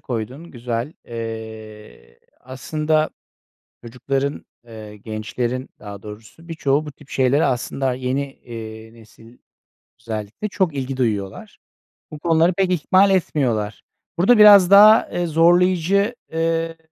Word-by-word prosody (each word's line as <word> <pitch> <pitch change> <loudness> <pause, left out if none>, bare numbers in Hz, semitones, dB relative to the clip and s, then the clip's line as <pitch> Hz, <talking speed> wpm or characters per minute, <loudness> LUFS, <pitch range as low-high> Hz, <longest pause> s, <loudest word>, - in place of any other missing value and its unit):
koydun. 125 +8 -6
Güzel! 120 +3 -4
Eee, 110 - -9 0.2
aslında 155 +4 -2 0.7
çocukların 135 +4 -3 0.2
eee, 110 -2 -11
gençlerin 115 +4 -4
daha 100 -1 -10
doğrusu 110 +10 -12
birçoğu 155 -3 -1
bu 150 - -8
tip 145 0 -20
şeylere 135 +3 +2
aslında 130 +1 -1
yeni, 130 +2 -2
eee, 110 -2 -10
nesil 115 +1 -18 0.6
özellikle 110 - -6
çok 185 -6 -1
ilgi 135 -1 -4
duyuyorlar. 105 -6 -3 0.5
Bu 150 - -9
konuları 165 +2 +2
pek 190 +1 0
ihmal 185 +3 +3
etmiyorlar. 125 - -1 0.4
Burada 215 +7 +4
biraz 200 -3 +8
daha, 210 +2 +7
eee, 175 - -2
zorlayıcı, 180 +6 +2 0.2
eee, 165 0 -1
135 Hz, 115 wpm, -20 LUFS, 115-165 Hz, 0.7 s, biraz